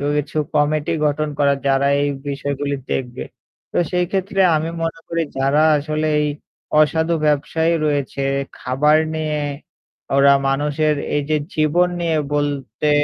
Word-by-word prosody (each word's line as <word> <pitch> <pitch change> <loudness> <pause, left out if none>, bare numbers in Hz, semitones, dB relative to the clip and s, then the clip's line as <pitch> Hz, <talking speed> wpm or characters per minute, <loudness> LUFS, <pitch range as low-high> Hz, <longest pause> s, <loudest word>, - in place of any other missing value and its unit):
কিছু 150 +1 -2 0.2
committee 155 +2 +1
গঠন 150 +1 0
করা 140 -1 +4
যারা 135 +1 +3
এই 145 - +1 0.2
বিষয়গুলি 140 0 -2
দেখবে। 125 -2 -3 0.5
তো - - +2
সেইক্ষেত্রে 190 +2 0
আমি 160 +2 -1
মনে 165 0 -3
করি 165 0 -1 0.2
যারা 135 +3 +2 0.2
আসলে 155 +1 -2
এই 150 - +1 0.5
অসাধু 160 +2 +2
ব্যবসায়ী 160 +3 +1
রয়েছে 140 -2 -1 0.4
খাবার 150 +5 +3 0.2
নিয়ে 155 -1 -1 0.8
ওরা 140 0 +6 0.2
মানুষের 150 +2 +1 0.2
এইযে 150 +1 0 0.2
জীবন 155 +4 +3
নিয়ে 165 -2 +1 0.2
বলতে 145 -2 -1
150 Hz, 125 wpm, -20 LUFS, 140-160 Hz, 0.8 s, ওরা